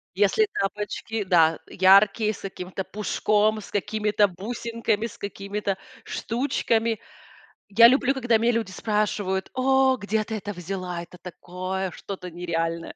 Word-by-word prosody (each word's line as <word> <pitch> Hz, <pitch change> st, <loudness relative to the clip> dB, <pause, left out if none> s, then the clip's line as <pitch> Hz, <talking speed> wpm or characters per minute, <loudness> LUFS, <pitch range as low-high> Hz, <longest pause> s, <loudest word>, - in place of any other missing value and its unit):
Если 205 Hz, -, +3 dB
тапочки, 210 Hz, +2 st, -3 dB
да, 165 Hz, -4 st, +4 dB
яркие, 200 Hz, +3 st, +4 dB
с -, -, -12 dB
каким-то 190 Hz, -1 st, -5 dB
пушком, 215 Hz, +1 st, +1 dB
с -, -, -12 dB
какими-то 210 Hz, 0 st, +1 dB
бусинками, 230 Hz, +3 st, -2 dB
с 225 Hz, -, -13 dB
какими-то 200 Hz, 0 st, -4 dB, 0.3 s
штучками. 230 Hz, -3 st, -1 dB, 0.7 s
Я 230 Hz, +3 st, +8 dB
люблю, 265 Hz, +1 st, +3 dB
когда 245 Hz, -4 st, +2 dB
меня 230 Hz, +2 st, +2 dB
люди 225 Hz, -5 st, -2 dB
спрашивают: 205 Hz, -2 st, -1 dB
"О, 265 Hz, 0 st, +3 dB
где 215 Hz, 0 st, -1 dB
ты 220 Hz, -, -4 dB
это 205 Hz, -1 st, -5 dB
взяла? 180 Hz, -1 st, -5 dB
Это 175 Hz, +1 st, -12 dB
такое 185 Hz, +1 st, -5 dB
что-то 185 Hz, 0 st, -7 dB
нереальное". 165 Hz, -1 st, -3 dB
205 Hz, 130 wpm, -25 LUFS, 185-225 Hz, 0.7 s, Я